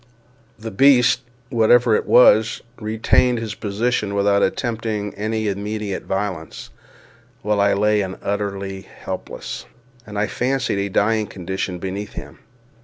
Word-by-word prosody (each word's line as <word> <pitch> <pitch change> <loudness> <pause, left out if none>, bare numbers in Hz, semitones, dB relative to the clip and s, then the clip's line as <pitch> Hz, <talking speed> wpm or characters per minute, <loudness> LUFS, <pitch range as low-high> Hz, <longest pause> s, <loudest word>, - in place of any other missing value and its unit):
The 110 0 -7
beast, 125 +2 +5 0.3
whatever 120 0 +4
it - - -1
was, 110 -3 +5 0.2
retained 115 +3 +2
his 115 -2 -4
position 105 0 -1
without 100 0 +3
attempting 110 -1 -1
any 110 +1 -2
immediate 105 0 -3
violence, 95 -5 -4 0.7
while 105 -1 +1
I 100 0 +4
lay 105 +1 +2
in 95 -1 -4
an - - -20
utterly 100 -1 -3
helpless, - - -7 0.4
and, 105 -1 -7
I 105 - +2
fancied, 125 -2 -1
a 100 0 -1
dying 105 +2 +1
condition 95 0 -4
beneath 95 +3 -5
him. - - -9
105 Hz, 130 wpm, -21 LUFS, 100-110 Hz, 0.7 s, beast